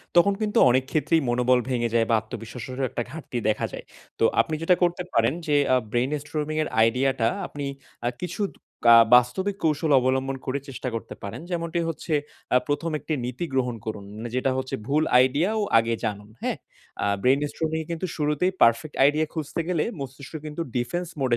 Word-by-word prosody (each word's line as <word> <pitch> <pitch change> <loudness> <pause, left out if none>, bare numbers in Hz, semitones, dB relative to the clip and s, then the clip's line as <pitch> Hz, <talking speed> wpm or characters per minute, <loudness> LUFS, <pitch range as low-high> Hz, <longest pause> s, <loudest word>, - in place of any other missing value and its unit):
তখন 175 +4 +6
কিন্তু 210 -1 0
অনেক 130 +2 +3
ক্ষেত্রেই 160 +1 +2
মনোবল 125 +1 +3
ভেঙে 120 -2 0
যায় 115 -1 +4
বা 115 - +4
আত্মবিশ্বাসেরও 115 +4 -6
একটা - - -3
ঘাটতি 150 -5 -6
দেখা 105 - 0
যায়। - - -7 0.3
তো - - +2 0.2
আপনি 155 - -3
যেটা 180 +2 +4
করতে 175 +1 +1
পারেন 115 +3 +3
যে 145 - +2 0.2
আ - - +6 0.2
brain-storming 150 +4 -1
এর - - -4 0.2
idea 130 +4 +1
টা 115 0 +3 0.2
আপনি 145 -1 -6 0.4
আ - - +2
কিছু 180 +4 -4 0.5
আ - - +10 0.2
বাস্তবিক 185 +12 +2
কৌশল 155 -1 +1
অবলম্বন 130 +1 0
করে 135 +1 -1
চেষ্টা 130 -1 -6
করতে 115 - -6
পারেন। 100 +9 -6
যেমনটি 170 0 -1
হচ্ছে 165 0 -4 0.4
আ - - +8
১ম 160 +3 -1
একটি 160 - -4
নীতি 125 +7 -3
গ্রহণ 125 -2 0
করুন, 105 -2 -5 0.3
যেটা 130 +1 +1
হচ্ছে 130 0 -2
ভুল 150 +3 +2 0.2
idea 145 +9 +1
ও - - +1 0.2
আগে 115 +1 0
জানুন। 105 -1 -4
হ্যাঁ? - - -1 0.5
আ - - +1 0.2
brain-storming 150 +5 +1
এ - - -20
কিন্তু 170 +2 -2
শুরুতেই 150 +4 +1
perfect 115 +6 +3
idea 155 +2 +2
খুঁজতে 160 +1 -3
গেলে 170 -4 +1 0.2
মস্তিষ্ক 135 +1 -8
কিন্তু 155 +2 -5 0.2
defense 170 +9 -2
mode 130 -3 +1
140 Hz, 180 wpm, -25 LUFS, 125-160 Hz, 0.5 s, আ